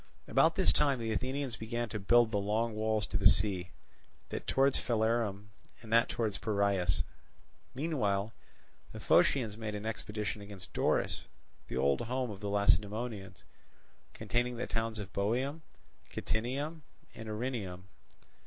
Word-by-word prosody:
About - - +4
this - - +4
time 140 -3 +3
the 115 -2 -2
Athenians 130 +2 -2
began 120 +2 -3
to 105 - -4
build 120 +3 +4
the 105 - +1
long 110 +3 0
walls 110 0 +1
to 95 - -1
the 100 - +6
sea, 95 -4 +2 0.6
that - - -5
towards 135 0 +3
Phalerum 110 -3 0 0.3
and 110 0 -5
that 115 0 +5
towards 110 -4 -1
Piraeus. 100 - +1 0.7
Meanwhile 115 -8 0 0.6
the - - -7
Phocians 115 -6 +3
made 110 -2 -4
an 105 +1 -5
expedition 105 -1 -3
against 100 -3 -9
Doris, - - +1 0.4
the - - -4
old 70 +1 +2
home 125 0 -2
of 100 - -8
the 100 -1 -3
Lacedaemonians, 105 +1 0 0.7
containing 120 +1 0
the 125 - -2
towns 115 -1 -2
of 100 -2 -7
Boeum, 130 +10 0 0.5
Kitinium, 140 +8 -2 0.3
and 110 -1 -8
Erineum. 105 -5 -3
110 Hz, 140 wpm, -32 LUFS, 100-120 Hz, 0.7 s, the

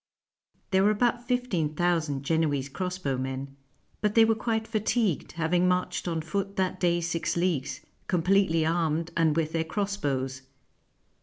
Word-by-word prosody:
There 190 0 +4
were 205 - +5
about 240 +3 +1
fifteen 200 -12 0
thousand 160 -5 0
Genoese 145 -3 0
crossbowmen; 135 -5 -3 0.5
but 210 -1 0
they 225 -1 +7
were 225 - +3
quite 220 0 -1
fatigued, 215 - 0
having 175 +2 +1
marched 180 0 0
on 165 -2 -1
foot 195 +5 -3
that 190 -2 -1
day 175 -1 +2
six 165 0 -1
leagues, 140 -7 -1 0.3
completely 180 -2 +2
armed, 165 0 0
and 160 -2 +3
with 160 -1 0
their 165 0 0
cross 200 +5 -2
bows. 135 -5 -2
170 Hz, 145 wpm, -27 LUFS, 155-195 Hz, 0.5 s, they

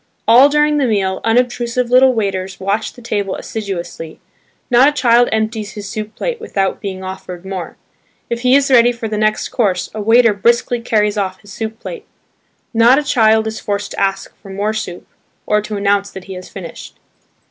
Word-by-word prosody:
All 250 +5 +7
during 300 0 +2
the 275 -3 +2
meal 195 -4 0
unobtrusive 245 +1 0
little 260 +1 +6
waiters 195 -3 -2
watch 200 +3 -2
the 245 - -15
table 205 -4 -2
assiduously; 175 -6 -6 0.5
not 250 +4 +6
a - - -2
child 245 -4 +3
empties 220 -1 -2
his 205 -1 -7
soup 215 +1 -6
plate 485 -3 -3
without 195 - -2
being 190 -2 -5
offered 185 -1 -8
more; 190 -3 -6 0.5
if 235 - -3
he 250 +2 +3
is 275 -1 +2
ready 240 -1 +6
for 235 -2 -5
the 215 - -3
next 215 0 0
course 195 -7 -1
a 215 - -4
waiter 230 +1 +5
briskly 235 +3 +1
carries 210 -2 +1
off 190 -1 -3
his 205 -1 -13
soup 220 0 -5
plate. 460 - -8 0.7
Not 235 +3 +5
a 300 - +1
child 220 -5 +3
is 220 0 -4
forced 205 0 -3
to - - -5
ask 195 0 -1
for 195 - -14
more 205 +3 -2
soup, 215 -5 -5 0.4
or 210 0 +2
to 210 0 -5
announce 200 0 +1
that 190 - -10
he 190 - -9
has 185 0 -9
finished. 175 -4 -9
215 Hz, 190 wpm, -17 LUFS, 195-240 Hz, 0.7 s, All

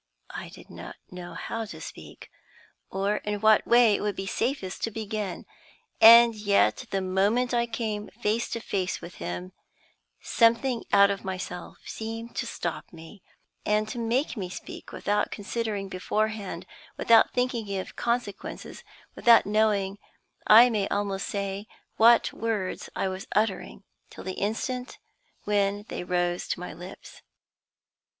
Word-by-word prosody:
I - - -7
did - - -14
not - - -9 0.2
know 175 -2 -8
how 225 +8 -4
to 210 - -9
speak, - - -11 0.6
or 195 +2 0
in 210 0 -3
what 215 0 +4
way 235 -2 +6
it - - 0
would 205 -1 -1
be 195 - -4
safest 210 -2 -2
to - - +1
begin; 215 -3 -4 0.6
and 235 +1 +10
yet, 210 +3 +2
the 195 - -1
moment 205 +7 +1
I 235 0 +2
came 220 -3 -3
face 220 +3 -2
to 230 - -2
face 190 -4 -2
with 170 - -10
him, 90 +1 -5 0.7
something 230 +2 +2
out 200 0 +6
of 200 - -4
myself 185 -2 -6
seemed 225 +1 -6
to - - -1
stop - - -5
me, 165 +4 -13 0.4
and 210 0 +1
to 240 - -5
make 235 +5 0
me 185 -4 -4
speak - - -9
without 210 0 0
considering 210 -1 -3
beforehand, 200 -1 -2 0.3
without 230 -1 +5
thinking 235 -5 -1
of 185 - -6
consequences, 235 -4 -3 0.3
without 235 -3 +6
knowing, 205 -1 +1 0.5
I 235 +3 +8
may 205 -3 0
almost 200 -1 -2
say, 200 +1 -4 0.3
what 230 +1 +5
words 215 -5 -3
I - - 0
was 185 0 -5
uttering 210 -2 -1 0.3
till - - -11
the 185 - -4
instant 250 +6 -3 0.5
when 205 0 0
they - - -4
rose 175 0 -1
to - - -2
my 180 - -6
lips. 175 +3 -11
210 Hz, 145 wpm, -27 LUFS, 195-230 Hz, 0.7 s, and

